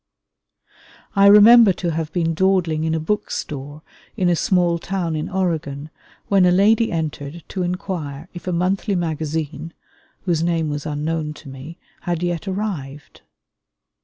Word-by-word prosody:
I 200 0 +6
remember 210 +1 +8
to 175 -1 -3
have 160 0 -3
been 165 -1 0
dawdling 170 -3 +1
in 160 0 0
a - - 0
book 205 +7 -2
store 145 +2 -6 0.3
in 185 -4 +2
a 175 - +3
small 175 -1 +1
town 175 -3 -2
in 155 +2 -3
Oregon 160 -6 -2 0.4
when 195 -2 +4
a 180 - +5
lady 215 +5 +3
entered 155 -1 -4
to 190 - -3
inquire 175 -5 -4
if 175 0 -10
a - - 0
monthly 185 +3 0
magazine, 160 -1 -3 0.5
whose 170 -4 0
name 165 -2 0
was 145 +1 -4
unknown 150 +1 -3
to 145 - -12
me, 135 +6 -10 0.2
had 175 -2 -3
yet 175 +2 -2
arrived. 175 -9 -5
170 Hz, 150 wpm, -21 LUFS, 155-185 Hz, 0.5 s, remember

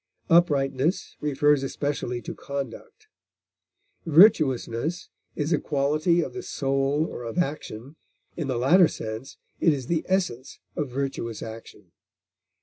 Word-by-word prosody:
Uprightness 145 -1 +2
refers 145 0 +3
especially 135 -3 -3
to - - -5
conduct. 140 - -7 1.0
Virtuousness 155 - +4 0.3
is 150 +2 0
a 155 - +2
quality 155 +4 +1
of - - -6
the 380 - -5
soul 135 - 0
or 125 - -7
of 115 -1 -6
action; 145 -4 -3 0.4
in 160 -5 -3
the 130 -3 -1
latter 165 +9 +6
sense 110 +1 -7 0.2
it 165 - +4
is 135 -4 -2
the 165 +3 0
essence 175 -10 -1 0.2
of 145 -3 -2
virtuous 125 -4 -3
action. 110 -5 -10
140 Hz, 125 wpm, -25 LUFS, 130-160 Hz, 1.0 s, latter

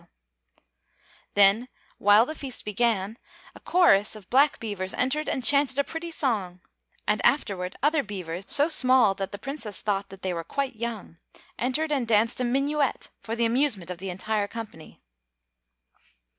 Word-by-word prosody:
Then, 205 +5 +4 0.3
while 205 +3 +5
the 310 - -6
feast 270 -5 -6
began, 210 -1 -1 0.4
a - - -14
chorus 220 - +3
of 205 -3 -14
black 280 +3 +3
beavers 200 -5 -3
entered 285 +4 0
and 260 - -2
chanted 280 0 +4
a 280 - +3
pretty 325 +3 -6
song; 210 - -2 0.5
and 210 - +1
afterward 195 -8 0
other 300 +1 +3
beavers, 185 -5 -6
so 290 +1 +5
small 255 -9 +4
that 195 0 -5
the 200 - -6
Princess 240 -4 -4
thought 200 -1 -2
that 195 0 -13
they 185 -1 -1
were 165 -1 -4
quite 270 - -3
young, 220 -7 -6 0.4
entered 285 +6 0
and 265 -5 0
danced 225 +2 +2
a - - 0
minuet 275 +2 -1
for 225 - -5
the 235 0 +1
amusement 230 - +1
of 175 - -7
the 190 +1 -5
entire 205 +3 -2
company. 215 -8 -10
230 Hz, 155 wpm, -26 LUFS, 195-275 Hz, 0.5 s, while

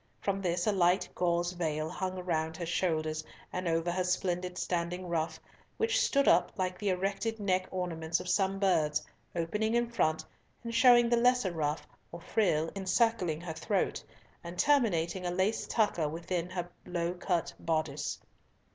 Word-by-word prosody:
From 195 -1 -1
this 175 -1 0
a 215 - +3
light 180 -1 +3
gauze 175 0 +1
veil 155 -3 -2
hung 185 +3 -3
round 160 -2 -1
her 170 - -3
shoulders 155 -3 0 0.3
and 180 -1 -2
over 165 +1 +1
her 185 +1 0
splendid 180 0 -1
standing 180 +1 -2
ruff, 160 -1 -1 0.4
which 465 +3 +2
stood 280 -10 +2
up 170 +1 +5
like 185 -1 -2
the 205 -2 0
erected 195 +4 -1
neck 185 -2 +1
ornaments 170 -2 -2
of 180 - -7
some 195 +1 +1
birds, 160 -6 +2 0.3
opening 210 +7 0
in 240 0 +2
front, 160 -8 +1 0.4
and 230 -1 -5
showing 240 0 +6
the 235 0 +3
lesser 245 -4 +3
ruff 155 -2 -2 0.3
or 170 - -7
frill 165 -4 +1
encircling 190 -4 +1
her 170 -2 -5
throat, 190 +5 -1 0.4
and 170 +1 -8
terminating 190 - +2
a 180 - -1
lace 190 +5 0
tucker 190 -9 +1
within 170 +2 -3
her 180 -2 -3 0.2
low 175 0 -1
cut 175 -1 -1
boddice. 160 -1 -1
180 Hz, 160 wpm, -31 LUFS, 165-195 Hz, 0.4 s, showing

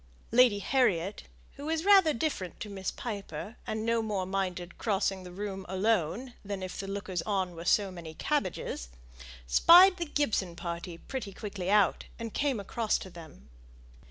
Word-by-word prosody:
Lady 240 -3 +6
Harriet, 200 -5 +1 0.3
who 285 +2 -6
was 325 +2 -1
rather 390 -5 +7
different 230 - -3
to 210 - -6
Miss 190 -1 -3
Piper, 210 0 -6
and 220 0 -2
no 230 0 +2
more 205 -4 -2
minded 185 -2 -3
crossing 195 -3 0
the 180 -1 -10
room 195 0 -5
alone 210 +4 0
than 200 -2 -5
if 185 - -6
the 195 - -4
lookers 195 -3 -3
on 185 -1 -1
were 165 +1 -8
so 200 +1 +3
many 165 -3 -9
cabbages, 185 - -2 0.6
spied 360 - +7
the 345 - -2
Gibson 220 -12 0
party 170 0 -5
pretty 215 0 -6
quickly 195 -2 -5
out, 205 -3 +3
and 230 -2 -6
came 280 -5 0
across 215 +2 0
to 190 - -9
them. 160 - -13
200 Hz, 160 wpm, -30 LUFS, 185-230 Hz, 0.6 s, rather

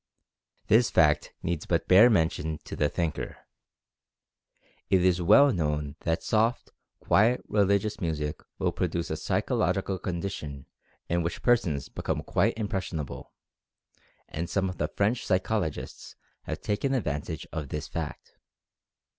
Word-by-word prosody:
This 115 +3 +4
fact 75 -2 +3
needs 85 -2 -2
but 85 -2 0
bare 105 +6 +8
mention 80 -5 +1
to - - -7
the 75 - +1
thinker. 85 -4 -3 1.5
It 95 -1 +4
is 90 -1 +3
well 125 +10 +6
known 75 -4 -1
that 80 0 -1
soft, 115 +3 +1 0.3
quiet 115 +5 +3
religious 100 +1 +1
music 75 -3 -2 0.2
will 90 - 0
produce 85 -1 -2
a - - 0
psychological 95 -2 0
condition 85 -7 -5 0.4
in 85 +1 +1
which 85 0 -4
persons 100 - +2
become - - -3
quite 110 +6 +1
impressionable, 95 - -4 1.0
and 85 +2 -4
some 95 -1 0
of 90 - -8
the - - +1
French 110 +5 0
psychologists 95 -3 -2 0.3
have - - -5
taken 135 +7 0
advantage 75 - -3
of 75 -3 -4
this 75 +1 -4
fact. - - -6
90 Hz, 130 wpm, -28 LUFS, 80-105 Hz, 1.5 s, bare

